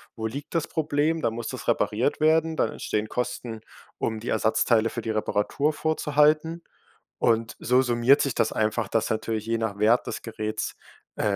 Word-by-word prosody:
Wo 110 - -5
liegt 140 +8 -5
das 165 - +1
Problem? 155 0 0
Dann 115 -1 0
muss 115 0 -4
das - - -7
repariert 115 +7 +1
werden. 160 +1 +3
Dann - - +1
entstehen 105 0 -2
Kosten, 125 -1 -4 0.4
um 110 -1 -1
die 115 - -6
Ersatzteile 110 +1 +2
für 120 - -5
die 110 - -2
Reparatur 110 +7 0
vorzuhalten. 155 +2 +1 0.6
Und 115 0 +1
so 125 +2 +3
summiert 125 +3 +4
sich 140 - 0
das 110 - +1
einfach, 110 0 0
dass 110 +1 0
natürlich 110 0 -2
je 115 0 0
nach 110 -3 -3
Wert 110 +4 +3
des - - -5
Geräts, 110 -1 -4 0.4
äh, - - -4
115 Hz, 175 wpm, -26 LUFS, 110-145 Hz, 0.6 s, summiert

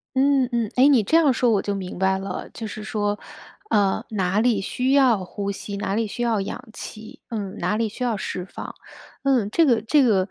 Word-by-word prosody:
嗯 270 -1 +3
嗯。 235 -3 -1
诶， 255 +2 +6
你 265 -7 +5
这 260 - +1
样 315 -4 +5
说 245 -1 +2
我 205 -3 +2
就 200 0 -2
明 185 -2 -6
白 190 0 +2
了， 195 -1 -5
就 225 - -6
是 215 0 -6
说， 205 -1 -1 0.5
呃， 200 -2 +2
哪 195 -2 0
里 230 -2 +3
需 250 +6 -1
要 255 -8 +4
呼 200 +2 -4
吸， 200 0 -6
哪 200 -1 -2
里 225 0 0
需 240 +4 -4
要 225 -4 +1
氧 195 - -6
气， 215 -1 -9
嗯， 205 -5 -4
哪 210 - 0
里 225 0 +1
需 235 +5 -6
要 235 -4 0
释 185 -1 -4
放， - - -8 0.5
嗯， 255 -7 +2
这 330 - +4
个 235 -6 +3
这 275 +6 +3
个， 195 -6 +3
215 Hz, 235 characters per minute, -23 LUFS, 200-250 Hz, 0.5 s, 诶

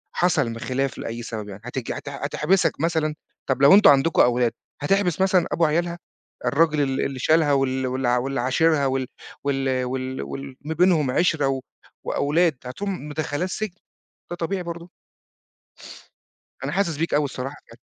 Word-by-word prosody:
حصل 140 -10 +1
خلاف 130 +1 -2
لأي 115 +1 -5
سبب 110 -3 -6
يعني، 100 +1 -9
هتيجي 125 0 -4
هت 145 - -7
هتحبسك 150 +5 0
مثلًا؟ 160 -2 0 0.3
طَب 130 +1 0
لو 140 +4 +8
أنتم 205 +1 +8
عندكم 140 +3 +4
أولاد، 120 -1 +3 0.3
هتحبس 185 +2 +1
مثلًا 190 -2 +3
أبو 165 - +2
عيالها؟ 170 +3 0 0.5
الراجل 155 0 +3
ال 135 -1 0
اللي 135 -2 -4
شالها 155 0 +3
وال 130 -1 +1
وال 130 0 -1
واللي 125 +2 0
عاشِرها 145 +3 +2
وال 130 -1 0 0.4
وال 135 -2 0
وال 130 +1 -3
وال 135 -1 -7
ما 155 +2 -4
بينهم 160 -6 +3
عِشرة 155 -3 +2
و 135 -1 -1 0.4
وأولاد، 160 0 +1
هتقوم 165 +5 -4
مدخّلاه 150 +2 -2
السجن؟ 190 0 -4 0.5
ده 175 - -4
طبيعي 180 +2 -2
برضه! 170 +1 -7 1.7
أنا - - -2
حاسس 180 -6 0
بيك 165 0 -1
أوي 145 0 +3
الصراحة 135 +1 -5
بجد. 115 - -15
145 Hz, 155 wpm, -23 LUFS, 130-165 Hz, 1.7 s, لو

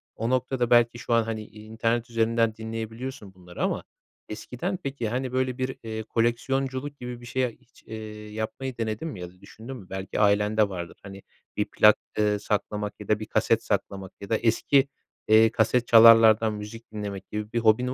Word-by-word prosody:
o 115 +1 -2
noktada 130 -1 0
belki 120 -1 +4
şu - - -2
an, 115 -1 +4
hani, 110 -1 -4
i 105 0 -14
internet 115 +2 -1
üzerinden 115 -1 +1
dinleyebiliyorsun 110 0 -6
bunları 90 -1 -10
ama - - -1 0.5
eskiden 125 - -4
peki, 135 -5 -3
hani, 125 +1 -2
böyle, 130 0 -1
bir, 130 0 -2
eee, 110 0 -5
koleksiyonculuk 130 +5 -1
gibi 125 -1 -7
bir - - -11
şeye 125 +1 0
hiç, 115 - -24
eee, 110 - -8 0.4
yapmayı 120 +4 -4
denedin 110 +6 -3
mi 120 - -7
ya 90 - -6
da 90 +1 -23
düşündün 120 +5 -10
mü? 95 -6 -13
Belki 95 0 -4
ailende 105 0 +3
vardır. 85 -3 -7
Hani, 100 0 -10 0.3
bir - - +1
plak, - - +5 0.2
eee, 105 -1 +2
saklamak 105 0 -2
ya 105 - -9
da 105 0 +2
bir 110 - -5
kaset - - +1
saklamak 95 -1 -3
ya 100 - -8
da 110 - +2
eski, 135 +4 +2 0.4
eee, 110 +1 +6
kasetçalarlardan 115 -1 +6
müzik 105 +2 -9
dinlemek 100 -3 -6
gibi 105 0 -4
bir 120 - +1
hobin 115 +3 +3
115 Hz, 180 wpm, -26 LUFS, 105-120 Hz, 0.5 s, eee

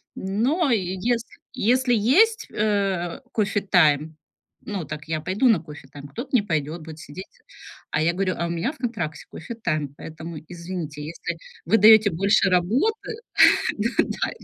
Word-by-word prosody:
Но 255 - 0
если 215 +4 -1 0.2
если 250 +3 +2
есть, 365 - +3
э, 195 -5 -1
кофе-тайм, 175 -8 +2 0.5
ну, 195 -6 -4
так 150 +2 -7
я 155 -1 -2
пойду 200 +10 +1
на 205 -7 +4
кофе-тайм, 145 -2 -11
кто-то 240 - -7
не 240 - +5
пойдет, 160 -3 -3
будет 160 0 -10
сидеть. 160 +7 -9 0.7
А 150 - 0
я 170 +2 +2
горю: 185 0 -1
"А 170 - -1
у - - -5
меня 170 - -1
в - - -18
контракте 200 -11 -4
кофе-тайм, 155 - -4
поэтому, 160 0 -8
извините, 170 -4 -6
если 160 +3 -5 0.3
вы 225 - +4
даёте 220 0 +7
больше 195 +3 +3
работы 235 - +1 0.7
д 220 +3 +1 0.2
да. - - -2
185 Hz, 145 wpm, -24 LUFS, 160-225 Hz, 0.7 s, даёте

